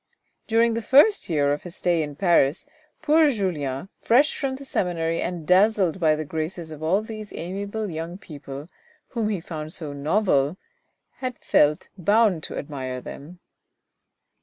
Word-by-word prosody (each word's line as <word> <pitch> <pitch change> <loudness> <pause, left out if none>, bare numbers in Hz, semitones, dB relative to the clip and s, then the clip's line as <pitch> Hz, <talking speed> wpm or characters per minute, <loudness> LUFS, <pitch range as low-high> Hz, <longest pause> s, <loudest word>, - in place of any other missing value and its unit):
During 230 +1 +3
the 230 - -2
first 290 - +5
year 145 -3 +2
of 145 - -4
his 175 -1 -10
stay 175 -2 +1
in 145 -2 -4
Paris 165 -3 +3 0.4
poor 310 0 +5
Julien, 175 - -2
fresh 270 +6 +4
from 270 -2 -2
the 275 +1 -9
seminary 165 -7 -1
and 175 -3 -4
dazzled 190 -1 +3
by 155 -3 +3
the 155 0 -4
graces 160 +2 -4
of 155 -1 -9
all 185 +7 +1
these 215 -2 -8
amiable 200 +5 -4
young 165 0 -5
people, 145 -5 -9 0.4
whom 225 -4 -1
he 205 -4 -1
found 155 -2 -6
so 150 -4 -6
novel, 150 0 +1 0.6
had 255 -2 -4
felt 150 +1 +2
bound 205 -1 +3
to - - -6
admire 130 -3 -5
them. 165 +7 -10
175 Hz, 155 wpm, -24 LUFS, 155-215 Hz, 0.6 s, first